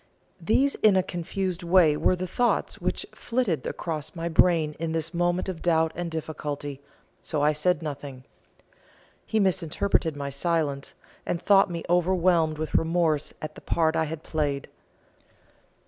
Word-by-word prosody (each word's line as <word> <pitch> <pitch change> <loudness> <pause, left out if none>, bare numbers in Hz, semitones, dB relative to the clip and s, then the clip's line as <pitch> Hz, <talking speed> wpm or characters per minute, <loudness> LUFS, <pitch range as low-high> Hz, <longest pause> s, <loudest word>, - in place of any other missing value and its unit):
These 265 +11 +2
in 210 -3 +4
a 185 - +3
confused 180 +1 -3
way 170 -3 +4
were 185 - +2
the 185 +1 -4
thoughts 240 +7 0
which - - -2
flitted 230 - -1
across 155 -2 -4
my 170 0 -3
brain 160 -2 +3
in 165 -1 -2
this 165 0 -2
moment 175 +2 0
of 185 -4 -5
doubt 160 -2 +2
and 175 0 -4
difficulty, 145 -3 -5 0.4
so 150 -2 -2
I 150 - +5
said 165 +3 0
nothing. 140 -3 -6 1.0
He 220 - +1
misinterpreted 185 -3 +1
my 140 -1 -4
silence, 145 -2 -1 0.3
and 170 - -2
thought 195 +1 +4
me 170 -1 -4
overwhelmed 175 -2 +2
with 155 0 -4
remorse 165 -2 +1
at 155 - -5
the - - -13
part 160 -1 +1
I 160 - +2
had 155 0 -6
played. 145 -3 -2
165 Hz, 150 wpm, -26 LUFS, 155-180 Hz, 1.0 s, I